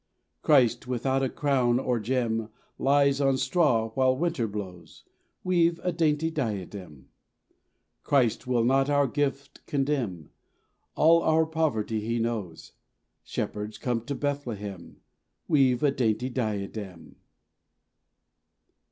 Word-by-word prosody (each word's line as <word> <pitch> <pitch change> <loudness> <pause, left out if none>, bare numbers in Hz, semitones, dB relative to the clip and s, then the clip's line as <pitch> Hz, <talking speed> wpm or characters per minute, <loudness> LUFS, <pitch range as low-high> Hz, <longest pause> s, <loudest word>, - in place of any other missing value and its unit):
Christ 125 -5 +3
without 130 +2 0
a 135 - 0
crown 130 -5 +1
or 125 -2 0
gem 115 -1 -1 0.3
Lies 140 0 +3
on 135 -1 +2
straw 130 -5 +1
while 130 +1 +2
winter 145 -7 -1
blows; 95 -4 -8 0.4
Weave 170 -2 +2
a 180 - 0
dainty 160 -1 +1
diadem. 95 - -5 0.9
Christ 125 -4 +1
will 120 -2 +2
not 135 +3 +2
our 145 -1 +3
gift 140 +1 -3
condemn; 135 - -2 0.6
All 165 +2 +5
our 160 0 +3
poverty 150 -9 -1
He 115 +2 -2
knows. 110 -8 -4 0.5
Shepherds, 105 +1 -4
come 120 -2 -2
to 140 - -3
Bethlehem, 110 -11 -5 0.5
Weave 135 -5 +3
a 145 - +4
dainty 120 -1 0
diadem. 100 - -5
130 Hz, 110 wpm, -27 LUFS, 110-145 Hz, 0.9 s, All